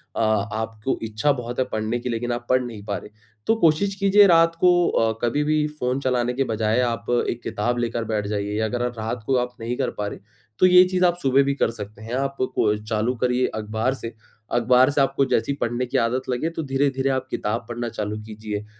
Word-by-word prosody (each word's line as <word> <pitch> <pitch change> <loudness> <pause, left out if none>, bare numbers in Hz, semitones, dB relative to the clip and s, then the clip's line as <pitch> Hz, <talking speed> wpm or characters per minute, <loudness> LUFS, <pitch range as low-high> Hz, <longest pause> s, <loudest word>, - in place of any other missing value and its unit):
अ, - - -1
आपको 110 +2 -1
इच्छा 110 +6 +1
बहुत 120 -1 -5
है 130 - +2
पढ़ने 110 +2 -1
की 125 - -4
लेकिन 120 +1 -2
आप 120 0 -5
पढ़ 130 0 +4
नहीं 115 -4 -8
पा 100 - -2
रहे, - - -10 0.4
तो 225 - +4
कोशिश 170 +5 +3
कीजिए 200 +1 +5
रात 165 -1 +5
को 175 -1 +5
अ, 115 0 +2
कभी 145 +5 +1
भी 155 0 +1
फ़ोन 125 +2 0
चलाने 125 -2 0
के 135 +2 0
बजाय 110 0 0
आप 115 -1 -1 0.2
एक 120 - -4
किताब 120 +4 -1
लेकर 115 -1 -1
बैठ 105 -2 -2
जाइए 105 0 -2
या 110 - +1
अगर 120 +3 -2
अ, 125 - +1
रात 110 +1 -4
को 135 - +2
आप 125 0 -2
नहीं 120 +2 -3
कर 135 - 0
पा 105 - -1
रहे - - -7 0.4
तो - - +6
ये 180 0 +8
चीज़ 185 -1 +3
आप 175 0 +2
सुबह 135 +1 +4
भी 140 - 0
कर 115 - +1
सकते 105 -1 -9
हैं। 115 +2 -7
आप 135 +1 -1 0.2
को 105 -1 +2
चालू 110 +3 -1
करिए 125 +1 +1
अख़बार 110 +4 -1
से, 115 -3 -7 0.4
अख़बार 125 +2 +4
से 145 - +2
आपको 135 0 +2
जैसे 120 0 0
ही 140 - -2
पढ़ने 120 +2 -1
की 125 - -1
आदत 120 +3 0
लगे, 125 +7 -1
तो 165 -1 -5
धीरे-धीरे 135 -1 0
आप 130 -1 -1
किताब 115 +3 -2
पढ़ना 120 0 -3
चालू 105 -1 -4
कीजिए। 105 -1 -6
120 Hz, 230 wpm, -23 LUFS, 110-135 Hz, 0.4 s, ये